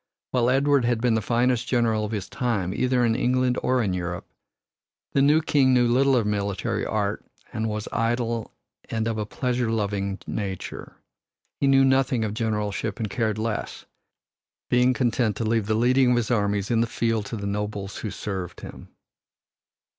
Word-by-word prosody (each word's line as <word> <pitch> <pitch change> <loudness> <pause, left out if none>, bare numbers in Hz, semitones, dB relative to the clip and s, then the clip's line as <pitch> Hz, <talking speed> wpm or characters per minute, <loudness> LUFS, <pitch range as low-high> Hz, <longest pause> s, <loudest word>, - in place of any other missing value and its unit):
While 125 -1 +2
Edward 140 +1 +3
had 120 -1 +1
been 120 0 +2
the 110 - +1
finest 120 +2 +1
general 115 -3 +1
of 105 - -3
his 105 -4 -3
time 105 -8 -1
either 125 +2 +1
in 115 - +2
England 125 0 +1
or 125 -1 +1
in 95 -3 0
Europe, 90 -1 -4 0.9
the 140 - +3
new 150 +3 +4
king 135 -4 +3
knew 120 -1 +4
little 135 +3 +3
of 115 -4 +2
military 100 -2 -1
art - - -1 0.3
and 110 0 -1
was 105 0 -4
idle 115 0 -1 0.4
and 110 -1 -1
of 110 -1 -2
a 105 - -3
pleasure 125 0 -1
loving 100 -3 -1
nature. 95 -3 -5 0.6
He 140 - +2
knew 135 0 +5
nothing 130 -3 +2
of 105 - -3
generalship 105 -2 -2
and 110 -3 -3
cared 110 -2 -1
less, 110 0 -3 0.9
being 125 +1 +4
content 120 -3 +1
to 115 - -3
leave 110 -2 0
the 110 - +1
leading 125 +3 +3
of 125 - +3
his 120 0 -1
armies 100 -2 0
in 115 -1 +3
the 115 - +1
field 115 -2 -1
to - - -5
the 100 - -5
nobles 100 0 -3
who 110 - -4
served 95 -4 -5
him. - - -10
115 Hz, 175 wpm, -25 LUFS, 105-125 Hz, 0.9 s, knew